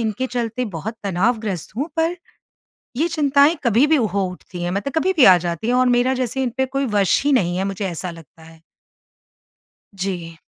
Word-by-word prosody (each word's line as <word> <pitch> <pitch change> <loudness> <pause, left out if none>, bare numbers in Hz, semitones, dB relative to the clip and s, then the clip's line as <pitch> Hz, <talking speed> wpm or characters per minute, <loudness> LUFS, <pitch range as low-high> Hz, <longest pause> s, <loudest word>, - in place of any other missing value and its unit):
इनके 225 +3 -2
चलते 245 -1 -3
बहुत 220 +7 -5
तनावग्रस्त 200 -1 -1
हूँ, 285 +6 -2
पर 330 +2 +1 0.8
ये 320 +5 +1
चिंताएँ 290 -1 +3
कभी 235 +4 +4
भी 315 +1 +3
हो 200 -6 0
उठती 180 -1 -9
हैं, 175 - -1
मतलब 200 +9 -3
कभी 365 +4 +2
भी 290 - +6
आ 185 - +8
जाती 170 +3 -4
हैं 245 - +1
और 255 0 +3
मेरा 245 +1 +2
जैसे 260 +1 -2
इन 250 - -1
पे 265 - +1
कोई 275 +1 -2
वश 195 -2 +3
ही 290 - +2
नहीं 180 -9 +2
है, 190 - -1
मुझे 195 +1 -3
ऐसा 175 +1 -5
लगता 165 0 -15
है। 160 0 -16 1.3
जी। 180 -4 -5
225 Hz, 195 wpm, -20 LUFS, 180-265 Hz, 1.3 s, आ